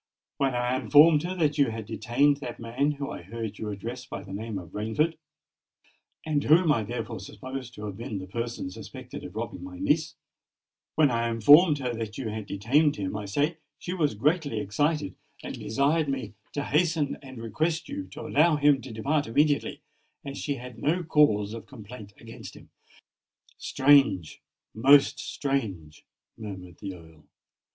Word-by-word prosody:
"When 135 -2 +1
I 125 +1 0
informed 145 +5 +6
her 180 +3 -3
that 150 -4 +1
you 140 - +4
had 110 -1 -5
detained 130 +8 +2
that 130 -4 -7
man, 130 +6 0
whom 140 -1 -5
I - - -7
heard 110 +3 -6
you 110 - -4
address 115 +5 -6
by 110 -5 -7
the 95 -1 -9
name 110 +1 -4
of 90 -3 -9
Rainford, 130 +11 0 1.1
and 150 -2 0
whom 160 +1 +5
I 115 - +2
therefore 115 +1 -5
supposed 130 +3 -8
to 105 - -7
have 100 -2 -6
been 110 -2 -5
the 95 - -6
person 115 -1 -4
suspected - - -9
of - - -9
robbing 90 - -5
my 90 0 -8
niece,—when 155 - -2
I 115 0 0
informed 145 - +7
her 125 -3 -2
that 110 -2 -5
you 120 -5 -3
had 110 -1 -5
detained 135 +11 +2
him, 95 0 -4
I 105 0 -4
say, 145 - 0 0.2
she 180 - -5
was 150 -10 0
greatly 145 - +1
excited, 145 +9 0 0.3
and - - -5
desired 145 +6 +1
me 135 -4 -3 0.2
to 145 - -2
hasten 155 -1 +1
and 130 -2 -11
request 155 +9 -1
you 95 - -5
to 95 - -10
allow 155 +2 +3
him 145 -2 +4
to 130 - -9
depart 140 +6 0
immediately, 145 +5 +1 0.4
as 140 0 -6
she 145 - -2
had 125 -2 -10
no 170 +7 +1
cause 110 -10 +3
of 115 - -8
complaint 110 -4 -11
against 115 -1 -11
him." - - -16 0.9
"Strange!—most 135 - +3
strange!" 100 - -3 0.4
murmured 95 -5 -8
the 95 -2 -6
Earl. 80 -3 -16
125 Hz, 165 wpm, -27 LUFS, 105-145 Hz, 1.1 s, informed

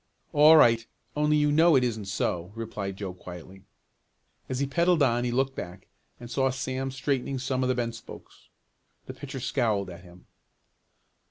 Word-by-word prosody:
"All 150 +2 +8
right, 115 -5 +5 0.3
only 150 0 +2
you 150 0 +2
know 160 +2 +5
it 130 - +4
isn't 110 -4 -2
so," 90 -2 -2
replied 105 -4 -5
Joe 95 -3 -5
quietly. 90 +1 -11 0.8
As 130 - -2
he 140 - 0
pedaled 170 +3 +2
on 120 -2 +2
he 120 - -1
looked 135 +2 0
back 90 +2 -8 0.3
and 120 - -9
saw 135 +2 +1
Sam 130 +1 -3
straightening 135 0 -2
some 130 0 -2
of 130 - 0
the 130 - +1
bent 120 -2 -2
spokes. 115 - -13 0.6
The - - -7
pitcher - - -7
scowled 100 -5 -1
at 85 0 -11
him. 90 0 -17
125 Hz, 170 wpm, -27 LUFS, 100-135 Hz, 0.8 s, All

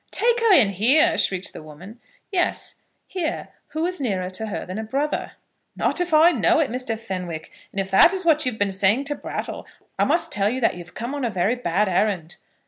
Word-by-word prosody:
"Take 475 0 +2
her 460 -2 +3
in 230 - +6
here?" 225 - +3
shrieked 185 0 -1
the - - -9
woman. 170 +9 -12 0.3
"Yes; 365 -2 -1 0.2
here. 360 -4 -4 0.2
Who 315 +2 -2
is 365 -1 -3
nearer 190 -7 -2
to 220 +4 -5
her 205 - -5
than 185 +4 -6
a - - -3
brother?" 275 +7 -2 0.4
"Not - - 0
if 355 -1 -2
I 315 +2 +6
know 345 0 +2
it, 305 -7 +1
Mr. 250 -2 -3
Fenwick; 180 -7 -6 0.2
and 195 - -4
if 190 0 -3
that 195 - +7
is 380 -2 -2
what 310 -2 +4
you 255 - 0
have 220 - -10
been 205 -2 0
saying 195 +7 +2
to 290 +1 -2
Brattle, - - -6 0.3
I - - +4
must 330 +4 0
tell 200 0 +1
you 255 +3 -2
that 225 - +3
you've 175 -1 -11
come 240 +4 -4
on 285 -2 -4
a 240 - 0
very 195 +2 0
bad 210 -4 0
errand. 175 -3 -1
225 Hz, 220 wpm, -23 LUFS, 190-305 Hz, 0.4 s, that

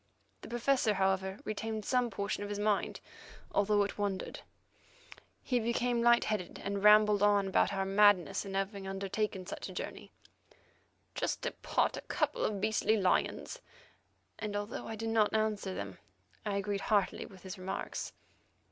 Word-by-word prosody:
The - - -9
Professor, 240 -2 +2
however, 190 0 +1
retained 215 0 -3
some 250 -2 +2
portion 200 -1 -3
of 205 - -4
his 205 - -3
mind, 205 0 0 0.5
although 205 0 +3
it 200 - -5
wandered. 200 -2 -2 1.0
He 250 -2 +1
became 235 +1 0
light 235 0 +5
headed, 210 -5 -3
and 200 0 -2
rambled 210 -1 +7
on 205 -1 +4
about 190 - +3
our 195 -1 -1
madness 195 -1 +4
in 195 -1 -6
having 195 0 -2
undertaken 195 0 -2
such - - -6
a - - -8
journey, - - -6 1.0
"just - - -2
to - - -1
pot - - 0
a - - -5
couple - - -1
of 205 -2 0
beastly 215 +1 +2
lions," 190 -3 0 0.8
and 210 -2 -3
although 205 +1 -4
I 225 - -4
did 225 +1 -3
not 220 -1 +3
answer 215 -3 0
them, 100 -1 -6 0.5
I 205 - 0
agreed 200 0 -1
heartily 205 -3 +1
with 190 -3 -15
his 190 0 -7
remarks. 190 +1 -4
205 Hz, 155 wpm, -32 LUFS, 195-220 Hz, 1.0 s, rambled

